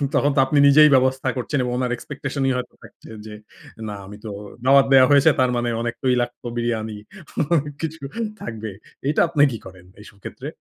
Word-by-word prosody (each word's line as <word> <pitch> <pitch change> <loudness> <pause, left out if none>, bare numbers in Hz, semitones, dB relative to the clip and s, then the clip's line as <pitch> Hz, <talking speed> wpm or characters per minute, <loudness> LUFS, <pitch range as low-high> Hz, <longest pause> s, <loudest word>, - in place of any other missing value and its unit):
তখন 145 0 +2
তো - - +3
আপনি 145 +2 0
নিজেই 150 +2 +7
ব্যবস্থা 130 0 +1
করছেন 130 +3 -2
এবং 125 - -2
উনার 125 -1 -1
এক্সপেকটেশনই 135 +1 -3
হয়তো 125 - -6
থাকছে, - - -16 0.2
যে 110 - -9 0.6
না 105 - -5
আমি 105 +2 -11
তো - - -5 0.4
দাওয়াত 135 +1 +6
দেয়া 130 -1 +8
হয়েছে। 140 +2 +6
তার 130 -1 +3
মানে 120 0 -1
অনেক 120 0 -3
তৈলাক্ত 125 -2 -1
বিরিয়ানি 110 -2 -2 0.6
অনেক 145 -2 -1
কিছু 160 -1 -5 0.4
থাকবে। 110 -2 -6 0.4
এটা 150 - +2
আপনি 150 -4 +3
কি 115 - -5
করেন, 95 -1 -13
এইসব 105 -1 -15
ক্ষেত্রে? - - -8
130 Hz, 180 wpm, -21 LUFS, 115-140 Hz, 0.6 s, দেয়া